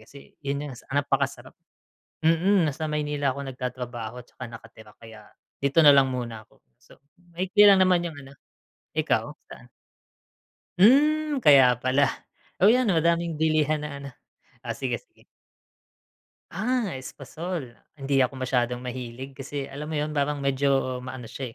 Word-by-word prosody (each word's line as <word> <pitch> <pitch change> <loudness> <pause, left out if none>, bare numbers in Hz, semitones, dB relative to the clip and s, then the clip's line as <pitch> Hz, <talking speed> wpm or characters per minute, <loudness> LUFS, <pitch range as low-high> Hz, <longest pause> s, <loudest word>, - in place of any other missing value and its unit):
kasi 140 - -14 0.2
yun 140 +1 -3
yung 130 - -8 0.2
napakasarap. 145 0 -1 0.7
Mm, 170 +1 +3
nasa 155 +3 -4
Maynila 145 -2 -1
ako 140 0 -6
nagtatrabaho 125 -2 -6
'tsaka 130 - -10
nakatira 110 -2 -13
kaya 110 -2 -13 0.4
dito 140 +4 +3
na 145 -2 +8
lang 135 -1 +5
muna 115 -3 -5
ako, - - -28 0.2
so - - -21 0.3
maikli 190 +4 +3
lang 195 -1 +6
naman 180 -2 +3
yung 165 -3 -5
ano. 135 -1 -13 0.7
Ikaw - - +1 0.3
saan? - - -13 1.1
Hmm, 295 +8 +4
kaya 135 - +6
pala. 130 +2 0 0.3
Oh, - - +3
'yan 240 +2 +4
madaming 170 -2 +1
bilihan 155 -1 +2
na - - -5
ano, 140 - -7 0.5
ah, 120 -2 -5
sige 125 -4 -3
sige. - - -28 1.3
Ah, 230 -1 -1
espasol, 150 +2 -7 0.2
hindi 135 -1 0
ako 130 +1 +1
masyadong 125 -1 0
mahilig 125 +1 -7
kasi 140 0 -5
alam 145 +2 -7
mo 160 - -4
'yon 150 +1 -1
parang 145 -1 -1
medyo 135 -2 +1
maano 130 -1 -8
siya, 125 -2 -7
140 Hz, 140 wpm, -25 LUFS, 130-165 Hz, 1.3 s, na